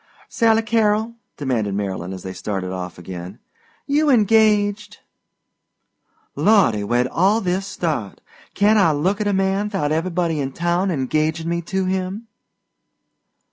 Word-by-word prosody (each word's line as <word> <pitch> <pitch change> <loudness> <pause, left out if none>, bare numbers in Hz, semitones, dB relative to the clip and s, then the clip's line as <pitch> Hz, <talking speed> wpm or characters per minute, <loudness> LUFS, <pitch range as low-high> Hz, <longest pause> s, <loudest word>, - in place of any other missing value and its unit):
"Sally 225 -1 +2
Carrol," 220 0 +1 0.2
demanded 115 -8 -1
Marylyn 95 -3 -3
as 95 -1 -7
they 95 - -6
started 95 -2 -4
of 90 -1 -6
again, 90 +2 -8 0.5
"you 295 +1 +2
engaged?" 210 -3 +3 1.4
"Lawdy, 195 - +3
where'd 120 +4 +1
all 190 - +2
this 190 0 -2
start? 150 - -3 0.4
Can't 210 +2 +4
I 165 -6 +4
look 185 +8 0
at 210 - 0
a - - +2
man 195 +1 0
'thout 185 -8 -1
everybody 165 0 -1
in 135 -1 -3
town 175 +4 0
engagin' 155 +2 -1
me 170 0 -1
to 190 +2 -2
him?" 190 +4 -3
180 Hz, 135 wpm, -21 LUFS, 125-210 Hz, 1.4 s, Can't